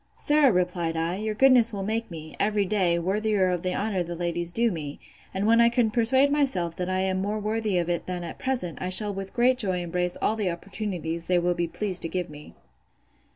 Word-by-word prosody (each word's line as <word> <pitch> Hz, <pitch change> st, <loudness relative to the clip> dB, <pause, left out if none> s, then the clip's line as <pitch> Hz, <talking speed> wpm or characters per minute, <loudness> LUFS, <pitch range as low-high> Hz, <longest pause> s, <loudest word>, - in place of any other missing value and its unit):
Sir, 295 Hz, -3 st, +3 dB
replied 175 Hz, -3 st, -1 dB
I, 165 Hz, +3 st, -1 dB
your 215 Hz, +1 st, -3 dB
goodness 250 Hz, -2 st, +5 dB
will 200 Hz, -2 st, -4 dB
make 225 Hz, +3 st, -2 dB
me, 160 Hz, -2 st, -9 dB
every 210 Hz, -1 st, +1 dB
day, 185 Hz, -4 st, +1 dB
worthier 195 Hz, +2 st, +1 dB
of 180 Hz, -2 st, -1 dB
the 180 Hz, 0 st, -2 dB
honour 200 Hz, -3 st, -1 dB
the 175 Hz, 0 st, -4 dB
ladies 170 Hz, 0 st, -2 dB
do 230 Hz, +3 st, +2 dB
me; 150 Hz, -5 st, -6 dB, 0.3 s
and 190 Hz, +2 st, -2 dB
when 230 Hz, +2 st, +5 dB
I 235 Hz, -, +6 dB
can 235 Hz, -2 st, +1 dB
persuade 260 Hz, +5 st, +3 dB
myself 255 Hz, -, 0 dB
that 180 Hz, 0 st, -3 dB
I 185 Hz, 0 st, 0 dB
am 190 Hz, 0 st, 0 dB
more 205 Hz, +2 st, -2 dB
worthy 215 Hz, -2 st, -1 dB
of 170 Hz, -1 st, 0 dB
it 175 Hz, -1 st, -2 dB
than 180 Hz, -1 st, -4 dB
at 170 Hz, -, -7 dB
present, 245 Hz, -11 st, -3 dB
I 185 Hz, -, -2 dB
shall 205 Hz, +2 st, +2 dB
with 195 Hz, 0 st, -6 dB
great 250 Hz, +1 st, +3 dB
joy 190 Hz, -6 st, 0 dB
embrace 180 Hz, +1 st, -2 dB
all 220 Hz, -, +1 dB
the 210 Hz, -4 st, -1 dB
opportunities 170 Hz, -3 st, -5 dB
they 180 Hz, -, +3 dB
will 175 Hz, 0 st, +1 dB
be 175 Hz, -1 st, -1 dB
pleased 185 Hz, +1 st, -1 dB
to 165 Hz, -, -1 dB
give 180 Hz, -3 st, -3 dB
me. 150 Hz, 0 st, -12 dB
190 Hz, 225 wpm, -26 LUFS, 175-220 Hz, 0.3 s, I